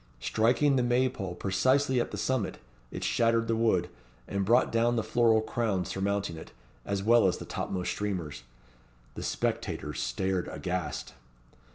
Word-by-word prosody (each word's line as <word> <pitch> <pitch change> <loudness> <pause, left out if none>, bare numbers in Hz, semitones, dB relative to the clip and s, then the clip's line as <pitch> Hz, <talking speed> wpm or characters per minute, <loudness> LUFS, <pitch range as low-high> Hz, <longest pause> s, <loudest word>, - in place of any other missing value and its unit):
Striking 120 - +2
the - - +3
May 125 +1 +3
pole 95 -7 -6
precisely 130 +8 +2
at - - -3
the - - -6
summit, 130 -7 -1 0.3
it - - -6
shattered 115 0 +2
the 115 - +1
wood, 110 -6 +2 0.4
and 100 0 -1
brought 120 +6 +3
down 115 +1 +2
the 115 - 0
floral 110 0 +3
crown 110 -4 -1
surmounting 100 -3 -2
it, 80 - -10 0.4
as 100 -1 -1
well 115 -1 +5
as 90 - 0
the - - -8
topmost 90 -2 -3
streamers. 90 -10 -3 0.7
The - - -7
spectators 75 -2 -2
stared 90 +10 -1
aghast. 90 +5 -4
105 Hz, 155 wpm, -29 LUFS, 95-120 Hz, 0.7 s, well